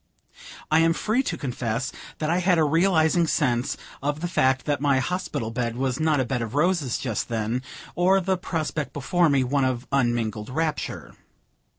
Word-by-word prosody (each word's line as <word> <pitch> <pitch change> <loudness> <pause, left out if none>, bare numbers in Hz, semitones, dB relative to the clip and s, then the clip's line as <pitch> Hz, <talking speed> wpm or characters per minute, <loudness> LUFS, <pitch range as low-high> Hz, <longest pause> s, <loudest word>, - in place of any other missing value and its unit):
I 155 - +5
am 165 0 +4
free 220 +8 +1
to - - -3
confess 125 -2 -3 0.3
that 155 - -2
I 175 - +2
had 180 -1 +3
a 160 - +4
realizing 165 +1 +3
sense 125 -5 0 0.2
of 145 +2 -2
the 175 - -1
fact 130 -6 +1
that 145 -2 0
my 140 -2 +3
hospital 130 -6 -2
bed 120 -1 -2
was 130 0 -1
not 155 -2 +2
a 130 - +1
bed 125 -1 -2
of 115 +2 -4
roses 155 -5 +1
just 115 -5 -3
then, 115 +2 -1 0.3
or 185 +2 +3
the 190 0 0
prospect 155 -6 -3
before 165 +5 +2
me 140 -2 +3
one 135 +2 +1
of 130 -1 -1
unmingled 120 -5 0
rapture. 155 +3 -3
145 Hz, 180 wpm, -25 LUFS, 125-165 Hz, 0.3 s, I